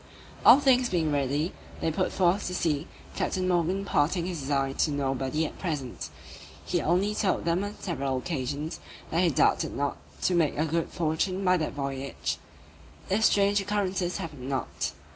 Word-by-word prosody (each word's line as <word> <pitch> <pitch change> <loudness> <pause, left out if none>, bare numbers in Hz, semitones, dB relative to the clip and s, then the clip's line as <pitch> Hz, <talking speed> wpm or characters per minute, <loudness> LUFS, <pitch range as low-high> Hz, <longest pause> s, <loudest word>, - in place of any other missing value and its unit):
All 270 - +9
things 255 -3 +4
being 165 -4 +1
ready, 145 +4 0 0.3
they 160 - 0
put 185 +4 0
forth 185 +2 +2
to 180 - -3
sea, 150 -5 0 0.3
Captain 185 -1 -1
Morgan 180 +2 +1
imparting 170 -2 +1
his 175 -3 -3
design 135 -1 0
to - - +3
nobody 135 +1 0
at - - -7
present; 145 -9 -4 0.6
he - - 0
only 185 +6 +2
told 205 -3 0
them 170 +3 +1
on 205 +1 -5
several 140 -7 -2
occasions, 145 +1 -3 0.3
that 165 - +2
he 180 - +4
doubted 145 - +2
not 140 0 -1 0.3
to 185 - +3
make 165 -5 +2
a 155 - +2
good 165 +1 -1
fortune 175 +4 -1
by 180 0 +5
that 155 -3 -2
voyage, 140 -1 -3 0.7
if 210 +3 +2
strange 200 0 +4
occurrences 195 -3 -1
happened 140 -5 -6
not. 135 -2 -2
165 Hz, 165 wpm, -28 LUFS, 145-185 Hz, 0.7 s, All